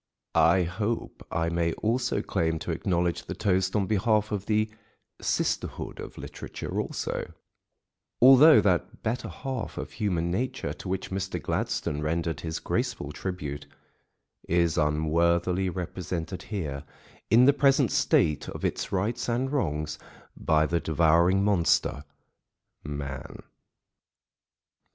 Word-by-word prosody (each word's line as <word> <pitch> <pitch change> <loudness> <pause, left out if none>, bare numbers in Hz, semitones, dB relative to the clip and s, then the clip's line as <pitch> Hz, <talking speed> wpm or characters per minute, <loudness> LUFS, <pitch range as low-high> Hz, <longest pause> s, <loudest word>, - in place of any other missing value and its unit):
I 90 +2 +5
hope 105 +7 -3
I 80 0 0
may 85 -1 0
also 125 +3 0
claim 80 -1 0
to - - -2
acknowledge 85 -2 -1
the - - -5
toast 95 0 +1
on 100 -2 +2
behalf 105 +1 +1
of 100 -1 -3
the 110 0 +2 0.5
sisterhood - - -2
of - - -8
literature - - -5
also, - - -4 0.9
although 135 +5 +8
that 90 -6 0
"better 120 +3 -2
half 130 -4 -5
of - - -5
human 85 -6 -1
nature," 130 +7 -2
to 95 - -8
which 95 0 -3
Mr. 95 0 -2
Gladstone 75 0 -2
rendered 80 0 -1
his 80 -1 -4
graceful 70 - -2
tribute, 75 -5 -5 0.8
is 85 -1 +2
unworthily 85 +4 +1
represented 90 0 -4
here, 75 -10 -3 0.5
in 120 +4 +6
the 140 - +6
present 140 -1 +3
state 75 -3 +2
of - - -5
its - - -2
rights 110 +6 -1
and 125 +3 0
wrongs, 75 - -1 0.4
by 80 0 +2
the 85 +2 0
devouring 85 +4 +3
monster, 85 -7 +2 0.8
man. 70 -3 -6
90 Hz, 125 wpm, -27 LUFS, 80-105 Hz, 0.9 s, although